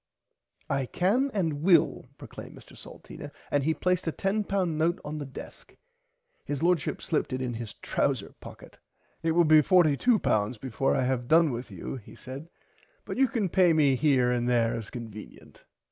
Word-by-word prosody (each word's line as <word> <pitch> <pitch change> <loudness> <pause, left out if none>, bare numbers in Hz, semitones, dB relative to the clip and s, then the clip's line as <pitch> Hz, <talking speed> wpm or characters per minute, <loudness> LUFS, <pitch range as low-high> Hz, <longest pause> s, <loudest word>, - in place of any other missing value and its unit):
I 135 -2 -1
can 225 - +1
and 165 -9 -1
will 170 -1 +3
proclaimed - - -11
Mr - - -16
Salteena - - -11 0.2
and 145 -1 +2
he 160 +2 +1
placed 180 -1 0
a - - +1
£10 195 0 -1
note 160 +2 0
on 150 +1 -5
the 145 - -6
desk. 135 - -11 0.7
His 145 +1 -4
Lordship 175 -4 0
slipped 155 - -1
it 130 - -2
in 125 -2 -3
his 115 -2 -7
trouser - - -2
pocket. - - -13 0.4
It 165 0 0
will 175 +1 +5
be 155 0 +7
£42 150 - +2
before 130 +2 -1
I - - +1
have 125 -1 -1
done 160 +1 +4
with 120 0 -5
you 95 +7 -6
he 110 - -13
said 135 +6 -9 0.6
but - - -5
you 270 0 +4
can 230 -5 -1
pay 180 -1 +4
me 145 -4 +4
here 130 -3 +2
and 120 0 0
there 115 -2 +2
as 110 -2 -6
convenient. 110 -3 -11
150 Hz, 175 wpm, -27 LUFS, 125-175 Hz, 0.7 s, be